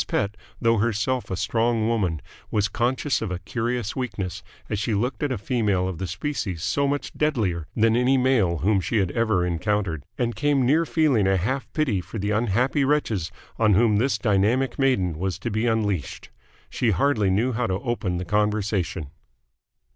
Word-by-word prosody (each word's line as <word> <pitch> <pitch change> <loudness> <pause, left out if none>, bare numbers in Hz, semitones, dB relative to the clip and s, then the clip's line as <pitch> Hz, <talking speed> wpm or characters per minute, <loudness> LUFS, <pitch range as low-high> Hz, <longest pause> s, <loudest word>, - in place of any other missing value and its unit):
Pett, 105 0 -1 0.2
though 115 0 +3
herself 120 +3 0
a 95 - -2
strong 115 +4 +1
woman, 95 -9 0 0.3
was 105 -1 +1
conscious 130 +5 0
of 110 - -2
a 90 - -3
curious 115 +4 -3
weakness 100 -8 -4 0.3
as 105 - -2
she 105 +1 0
looked 120 +6 -1
at 145 -2 0
a 125 - -1
female 105 -4 0
of 90 -4 -5
the 95 - -3
species 95 - -3
so 140 0 +1
much 145 +1 -2
deadlier 105 - 0
than 115 0 +3
any 125 +2 +3
male 120 -10 +2
whom 95 +6 +2
she 110 - -1
had 95 -4 +1
ever 110 -6 +1
encountered: 90 -2 -1
and 120 -2 -1
came 145 -3 +2
near 155 +6 +3
feeling 140 -11 +2
a 95 0 +3
half 130 +9 -2
pity 125 - +1
for 110 - -8
the 105 +1 -1
unhappy 120 +6 +1
wretches 115 - 0 0.3
on 110 -3 +4
whom 110 0 +4
this 125 0 +1
dynamic 110 +5 +1
maiden 95 - +1
was 95 -1 -2
to 120 - -4
be 110 +3 0
unleashed. 105 - -1 0.4
She 120 - +1
hardly 105 0 +2
knew 110 +7 +2
how 120 0 -1
to 95 - 0
open 110 -5 -2
the 90 - -4
conversation. 105 -7 -1
110 Hz, 180 wpm, -24 LUFS, 95-125 Hz, 0.4 s, on